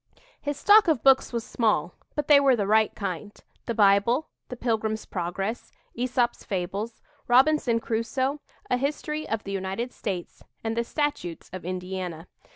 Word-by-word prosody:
His 290 -1 -3
stock 415 +6 +6
of 305 -9 +2
books 270 -1 +5
was 235 -2 -2
small, 205 -8 +1 0.2
but 295 -1 -2
they 290 -2 +8
were 275 -2 +4
the 205 -4 -1
right 215 +1 +3
kind 200 +1 -5 0.3
the 235 - -1
Bible, 210 +7 +3 0.2
"The 250 - -5
Pilgrim's 220 -2 -1
Progress," 195 +5 -4 0.2
Æsop's 245 0 0
Fables, 200 +4 -4 0.2
"Robinson 250 -1 +4
Crusoe," 260 +6 -1 0.3
a 250 - +1
history 300 +3 -3
of 225 -1 -2
the 195 - -6
United 195 +6 -3
States, 185 -5 -5 0.2
and 225 0 -2
the 235 - +1
Statutes 260 - -3
of 185 - -6
Indiana. 180 -2 -4
225 Hz, 155 wpm, -26 LUFS, 195-260 Hz, 0.3 s, they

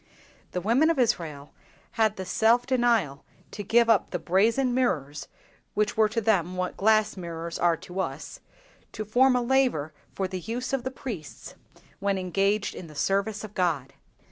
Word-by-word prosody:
The 180 - -2
women 240 - +3
of 330 - +1
Israel 165 - -1 0.4
had 220 -2 +1
the 190 - -6
self 230 +5 +3
denial 235 - +1 0.3
to 205 - -6
give 235 +4 +3
up 225 -5 +3
the 180 - -2
brazen 225 +9 +2
mirrors—which 210 - -3
were 220 -1 +3
to 230 - -1
them 185 -5 +1
what 185 0 -2
glass 215 +1 +3
mirrors, 170 -2 -6
are 170 -1 +3
to 180 +4 -8
us—to 215 +3 -8
form 250 +5 +4
a 250 - +1
laver 240 - +1 0.2
for 190 - -1
the 185 0 -5
use 240 +7 -4
of 270 -3 0
the 260 - -2
priests 225 - -8 0.5
when 200 0 0
engaged 195 +3 0
in 175 - -9
the 155 - -13
service 200 +6 0
of 215 -1 -8
God. 155 -9 -1
205 Hz, 165 wpm, -26 LUFS, 180-235 Hz, 0.5 s, form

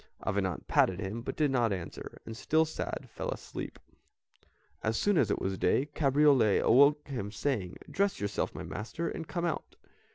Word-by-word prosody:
Avenant 95 -4 -1
patted 95 0 +3
him, 105 +3 -4
but - - -5
did 150 -3 +2
not 120 -4 +2
answer, 90 -4 -6
and, 115 - -7
still 160 +7 +2
sad, 160 - -5
fell - - -4
asleep. - - -6 1.0
As 110 0 0
soon 205 -1 +2
as 125 - +3
it - - 0
was 95 0 -2
day, 135 - +3
Cabriole 140 -7 +4
awoke 140 +5 +5
him 110 -8 -4
saying, 105 -8 -2
"Dress 200 0 0
yourself, 100 0 -2
my - - -5
master, 120 +10 -4
and 165 - -5
come 175 -1 -2
out." 170 - -3
125 Hz, 170 wpm, -31 LUFS, 100-150 Hz, 1.0 s, awoke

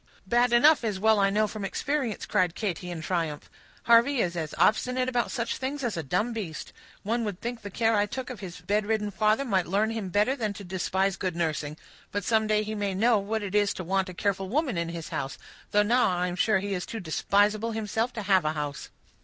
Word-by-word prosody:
"Bad 240 +4 +3
enough, 280 +5 +6
as 210 -4 -1
I - - -9
well 205 -2 +4
know 215 +2 +3
from 210 0 -6
experience," 260 +2 -2
cried 180 -2 +1
Katy, 180 -4 -3
in 165 -2 -5
triumph. 165 -4 -2 0.3
"Harvey 235 +4 +5
is 175 -5 0
as 160 -2 -4
obstinate 255 +3 +2
about 245 -2 0
such 235 -3 -2
things 275 +2 -4
as 235 -3 -1
a 165 - -2
dumb 210 - -1
beast; 180 -9 -6 0.3
one 230 +3 0
would 205 -4 -4
think 240 0 -5
the 205 - -7
care 225 +3 +1
I 205 0 +2
took 255 +2 -5
of 240 - -8
his 185 -3 -8
bedridden 210 0 0
father 215 +6 +2
might 190 -7 +1
learn 205 +5 +1
him 220 -4 -4
better 210 +8 +2
than 215 -6 -2
to 205 - -9
despise 190 +1 -1
good 185 -3 -2
nursing. 155 -3 -2 0.3
But 205 0 -2
some 220 -1 +2
day 215 0 +2
he 215 +1 -4
may 205 -2 -2
know 225 +2 +4
what 215 +2 -2
it 200 -1 -5
is 205 -1 +2
to 185 - -5
want 190 +2 0
a 180 - -9
careful 195 0 -1
woman 275 - 0
in 170 0 -1
his 170 -1 -6
house, 135 0 -4 0.3
though 210 0 +4
now 240 +3 +3
I 180 -1 0
am 180 -1 -3
sure 215 +3 +3
he 200 +1 -3
is 180 -2 -3
too 225 - -5
despisable 205 +5 +1
himself 220 +2 -1
to 220 - -5
have 190 -2 +3
a 155 0 0
house." 150 -2 -5
205 Hz, 230 wpm, -27 LUFS, 185-225 Hz, 0.3 s, enough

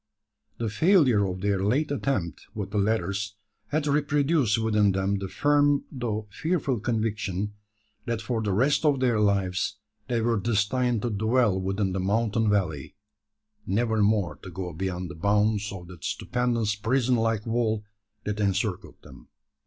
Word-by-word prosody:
The 115 - -2
failure 125 - +4
of 90 0 -5
their 100 -1 +1
late 140 +9 +1
attempt 130 -12 -2
with 100 -2 -4
the 105 - 0
ladders 100 -1 -1 0.3
had 150 0 -1
reproduced 145 -4 +2
within 105 -3 +2
them 95 +1 0
the 95 - -4
firm 145 +5 +2
though 110 -5 -3
fearful 150 - -1
conviction, 105 -3 -2 0.5
that 115 -1 -1
for 115 0 -2
the 105 -2 -1
rest 130 +11 +2
of 145 -3 +3
their 120 -4 +2
lives 100 -1 +1 0.3
they 120 -2 0
were 115 -1 +1
destined 115 +2 +1
to 120 - -1
dwell 110 -1 +2
within 95 +1 -1
the 95 - -1
mountain 110 +3 +1
valley 90 -8 -1 0.7
never 110 +2 +1
more 105 -4 +2
to 95 - -10
go 90 0 -5
beyond 90 +1 -3
the - - -9
bounds 105 +3 +1
of 95 -3 -8
that 90 -3 -12
stupendous 120 -4 0
prison 125 +4 +1
like 115 -2 0
wall 115 -2 0 0.4
that 105 0 -3
encircled 100 -1 -1
them. 65 -2 -14
105 Hz, 155 wpm, -26 LUFS, 100-120 Hz, 0.7 s, failure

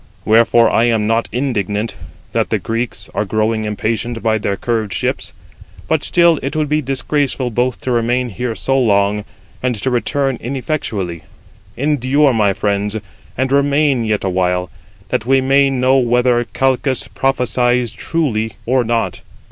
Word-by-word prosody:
Wherefore 115 +1 +5
I 115 - +3
am 115 -3 +1
not 115 +1 +1
indignant 110 -5 -1 0.4
that - - 0
the - - +1
Greeks 115 +1 -3
are - - 0
growing 110 +1 0
impatient 110 +2 -2
by 110 -1 +2
their 100 -1 -2
curved 110 -4 -2
ships; - - -2 0.6
but 160 -2 +1
still 170 -3 +4
it 135 - -4
would 155 -1 0
be 150 +1 +1
disgraceful 135 -1 -1
both 125 +2 0
to 130 - -2
remain 120 +1 +1
here 115 +3 -3
so 135 +3 0
long, 105 -3 +2 0.4
and 125 -1 0
to 120 +5 -2
return 135 +1 0
ineffectually. 115 - -3 0.6
Endure, 140 0 +2
my 105 -3 +3
friends, 100 +1 -1 0.4
and 130 0 0
remain 140 -2 +2
yet 110 -2 -1
awhile, 90 -1 0 0.4
that 110 - -1
we 135 0 +4
may 135 +1 +3
know 130 0 +2
whether 120 0 +2
Calchas 130 -1 0
prophesies 125 0 +1
truly 115 -10 -1
or 130 +1 +2
not. 115 0 -1
120 Hz, 150 wpm, -17 LUFS, 110-135 Hz, 0.6 s, Wherefore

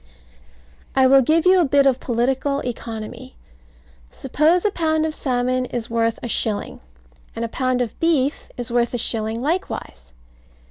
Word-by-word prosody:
I 265 -1 +5
will 270 +1 +6
give 315 +6 +2
you 370 0 +6
a - - +4
bit 280 0 +3
of 265 -2 +3
political 265 +4 -1
economy. 225 - -7 0.7
Suppose 310 - +1
a 420 - +3
pound 315 -3 0
of 315 - -2
salmon 255 -2 -1
is 240 -2 -5
worth 230 0 +1
a - - -3
shilling; 215 -2 -1 0.6
and 230 - -2
a - - -3
pound 255 +1 -1
of 235 - -8
beef 300 -4 0
is 240 -1 -4
worth 240 0 +1
a - - 0
shilling 225 0 -1
likewise. 270 - -4
255 Hz, 155 wpm, -21 LUFS, 235-295 Hz, 0.7 s, will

